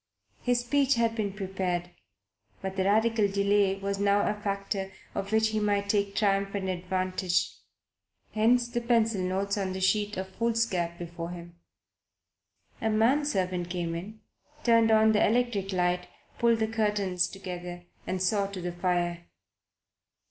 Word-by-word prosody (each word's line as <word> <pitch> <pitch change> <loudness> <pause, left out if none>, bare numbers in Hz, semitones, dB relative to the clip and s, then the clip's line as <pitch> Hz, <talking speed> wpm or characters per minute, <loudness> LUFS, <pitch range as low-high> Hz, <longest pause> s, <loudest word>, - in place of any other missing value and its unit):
His 245 -1 +1
speech 275 +2 +2
had 230 -1 +1
been 210 -3 -1
prepared; 185 -3 -3 0.7
but 190 -1 -5
the 190 -1 0
Radical 220 +1 +3
delay 200 0 +2
was 195 0 -3
a - - -2
new 205 +1 +3
factor 195 -1 -2 0.2
of 195 +1 -4
which 220 0 +3
he 215 0 -1
might 205 -1 0
take 200 -1 +1
triumphant 195 -1 +1
advantage. 185 0 -1 0.8
Hence 235 +3 +3
the 240 0 -2
pencil 230 -4 +2
notes 195 +2 -1
on 190 -1 -2
the 190 - -4
sheet 205 +2 +1
of 190 0 -3
foolscap, 220 -6 0
before 170 -1 -6
him. 175 -1 -10 1.2
A 225 - +1
man 235 +7 +3
servant 185 -8 -1
came 175 -2 -2
in, 205 +6 -7 0.4
turned 230 -1 +5
on 220 0 +5
the 215 - +3
electric 220 -4 +1
light, 180 -1 0 0.3
pulled 235 -1 +4
the 220 0 0
curtains 205 -5 0
together 180 -2 -7 0.2
and 185 - -1
saw 200 +1 +2
to 200 -1 -7
the 175 0 -3
fire. 175 -1 -1
200 Hz, 150 wpm, -28 LUFS, 185-220 Hz, 1.2 s, turned